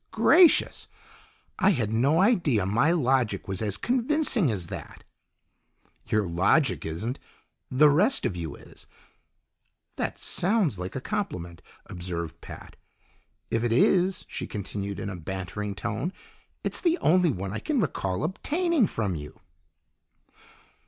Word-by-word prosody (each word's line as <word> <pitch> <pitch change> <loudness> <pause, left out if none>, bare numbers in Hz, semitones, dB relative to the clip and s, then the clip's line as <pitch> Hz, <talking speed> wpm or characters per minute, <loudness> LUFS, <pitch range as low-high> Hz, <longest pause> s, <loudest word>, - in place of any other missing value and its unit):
"Gracious! 355 -3 +4 0.7
I 190 -2 +4
had 110 -4 -1
no 140 +9 +3
idea 170 - +2
my 120 - +2
logic 130 - +1
was 95 0 -4
as 105 -2 -2
convincing 250 - +1
as 95 -6 -3
that." - - -9 1.0
"Your 110 -2 +1
logic 95 - +1
isn't. 110 - -4 0.5
The 150 +4 +5
rest 205 - +2
of 90 - -1
you 80 -5 -5
is." - - -14 1.1
"That - - -2
sounds 180 - 0
like 90 +1 -6
a 130 - -3
compliment," 90 - -4 0.2
observed 85 -2 -6
Pat. - - -11 0.7
"If 115 - 0
it 120 - 0
is," 185 +9 +3
she - - -6
continued 100 -1 -5
in - - -4
a - - -6
bantering 95 +4 -5
tone, 115 - -3 0.5
"it's - - -2
the 340 -1 +2
only 180 - +3
one 95 -6 -3
I 110 - -3
can 295 -4 -1
recall 95 - -1
obtaining 300 - +1
from 105 - -2
you." 75 -2 -8
115 Hz, 130 wpm, -26 LUFS, -, 1.1 s, The